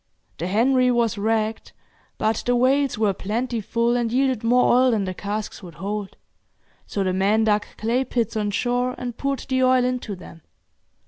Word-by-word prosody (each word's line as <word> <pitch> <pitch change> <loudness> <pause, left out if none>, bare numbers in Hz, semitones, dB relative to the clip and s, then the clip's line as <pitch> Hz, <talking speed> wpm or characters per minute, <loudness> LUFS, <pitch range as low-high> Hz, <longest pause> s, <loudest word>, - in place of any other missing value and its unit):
The 170 - -2
'Henry' 250 +6 +3
was 235 -3 +1
wrecked; 220 +1 -1 0.4
but 220 0 0
the 245 - +3
whales 265 +2 +2
were 210 -2 +2
plentiful, 230 +3 -1
and 235 -2 0
yielded 260 -2 +1
more 245 +2 +4
oil 255 +1 +5
than 220 -4 +1
the 185 -1 -3
casks 210 +3 -5
would 175 -5 -11
hold, 200 +4 -5 0.7
so 200 - -2
the 185 -1 0
men 200 +4 +2
dug 210 -1 +1
clay 235 +4 0
pits 235 -3 -2
on 210 -1 0
shore, 245 +4 0
and 245 -2 -5
poured 275 +1 -2
the 260 -1 +1
oil 255 -1 +4
into 250 -5 -2
them. 165 -2 -13
230 Hz, 175 wpm, -23 LUFS, 210-250 Hz, 0.7 s, oil